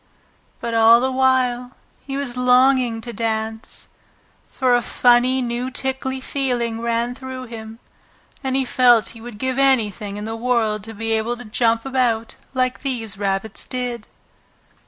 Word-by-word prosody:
But 235 - -4
all 225 +1 +7
the 260 +2 0
while 255 -1 +1 0.3
he 275 -1 -4
was 275 -4 -3
longing 250 -2 +3
to 235 +1 -7
dance, 220 0 -3 0.6
for 255 -2 +2
a 245 - +2
funny 250 +2 +3
new 240 +1 -2
tickly 265 0 -2
feeling 245 -4 -2
ran 235 +1 0
through 260 0 -7
him, 225 -2 -9 0.7
and 265 -1 -1
he 265 -1 +1
felt 245 -4 +4
he 230 - -11
would 235 -2 -9
give 260 +3 -1
anything 215 -7 +1
in 210 - -5
the 225 +1 -4
world 225 -3 0
to 225 0 -9
be 225 +2 -3
able 225 +2 0
to 245 - -10
jump 230 +2 +1
about 245 -4 0 0.2
like 255 0 0
these 225 -7 -3
rabbits 195 +1 -2
did. 245 -3 -4
240 Hz, 155 wpm, -21 LUFS, 225-255 Hz, 0.7 s, all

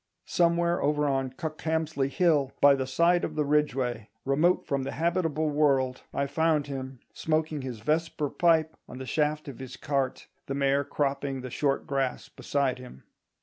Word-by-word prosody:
Somewhere 170 0 +2
over 150 0 +1
on 135 -1 0
Cuckhamsley 155 -2 -2
Hill, 150 -5 +2
by 140 0 +7
the 130 -1 -1
side 170 +6 +3
of 155 - -3
the 150 -1 +1
Ridgeway, 130 -7 0 0.2
remote 155 +7 +2
from 140 -1 -1
the 135 +1 -4
habitable 160 -2 0
world, 135 -4 +2
I 140 - -1
found 155 +1 +1
him, 130 -2 -6
smoking 155 -1 -1
his 125 -4 -6
vesper 155 +2 -1
pipe 160 -2 +2
on - - -8
the 130 - -6
shaft 150 +2 0
of 135 -4 -8
his 130 -1 -8
cart, 135 -3 -2 0.2
the 135 - -2
mare 140 0 +2
cropping 140 -1 -2
the 130 -1 -7
short 140 +1 0
grass 135 -2 -2
beside 140 -3 -1
him. 125 - -12
145 Hz, 165 wpm, -28 LUFS, 135-155 Hz, 0.2 s, by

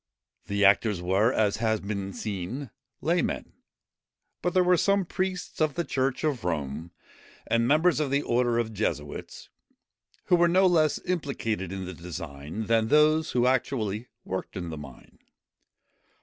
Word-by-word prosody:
The 100 0 +2
actors 100 0 +4
were, 95 +6 +2
as 105 -5 +1
has 110 -1 +1
been 100 -1 -4
seen, 105 +7 -5 0.3
laymen; - - -1 0.9
but 180 0 -1
there 185 - +5
were 180 0 +5
some 200 +2 +2
priests 185 -1 -3
of 155 -2 +2
the 170 - 0
church 135 -2 -1
of 145 - 0
Rome, 80 -1 -3 0.6
and 115 0 +2
members 155 +3 +4
of 150 -3 0
the 140 +2 +1
order 120 0 +1
of 115 -2 -1
Jesuits, 75 -8 -4 0.8
who 180 - +4
were 175 0 +5
no 185 +3 +4
less 160 -5 +3
implicated 115 - -2
in 95 -1 -4
the 95 - -6
design 85 +1 -6
than 115 0 +2
those 155 +3 +4
who 125 -1 +3
actually 125 -4 0 0.2
worked 95 0 -4
in 85 -2 -4
the - - -5
mine. 70 -3 -12
115 Hz, 150 wpm, -27 LUFS, 95-150 Hz, 0.9 s, there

